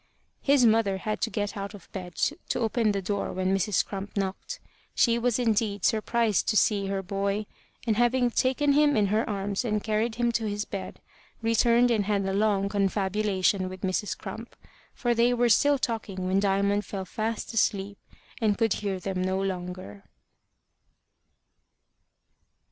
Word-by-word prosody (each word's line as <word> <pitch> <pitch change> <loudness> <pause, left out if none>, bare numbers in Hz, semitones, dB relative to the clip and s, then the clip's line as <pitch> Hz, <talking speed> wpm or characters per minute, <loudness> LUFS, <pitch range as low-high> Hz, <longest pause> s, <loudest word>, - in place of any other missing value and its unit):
His 275 -3 +4
mother 220 -3 +3
had 215 +2 -3
to 230 - +1
get 205 -2 -3
out 200 +1 -5
of 195 - -14
bed 180 -3 -7
to 300 +5 -1
open 225 -1 +1
the 200 -1 -2
door 200 +2 -2
when 185 +1 0
Mrs. 195 +1 +1
Crump 200 +1 -7
knocked. 195 - -3 0.4
She 235 -1 +3
was 240 -1 +1
indeed 220 -4 0
surprised 220 -1 +1
to 215 - +2
see 200 -2 +2
her, 195 0 -2
boy; 200 +2 -2 0.4
and 220 -3 +1
having 240 +1 +2
taken 270 +4 +2
him 290 -2 +4
in 210 - +3
her 220 +1 +1
arms 200 +1 -2
and 215 -3 -1
carried 220 +1 0
him 240 0 +1
to 225 -2 -1
his 205 +1 -3
bed, 195 -1 -7 0.4
returned 235 +2 +3
and 215 -3 +1
had 200 -1 0
a 195 - -1
long 200 -1 +2
confabulation 195 -1 0
with 185 0 -9
Mrs. 190 +2 -1
Crump, - - -8 0.4
for 240 -1 0
they 235 +1 +3
were 240 0 +2
still 285 +6 +4
talking 215 -7 -3
when 190 +1 +2
Diamond 200 +1 +1
fell 190 0 -5
fast 220 +5 -3
asleep, 200 -2 0 0.4
and 210 -2 +2
could 225 -3 +2
hear 195 -2 -2
them 185 0 -3
no 185 +1 0
longer. 180 - -5
205 Hz, 165 wpm, -27 LUFS, 195-230 Hz, 0.4 s, His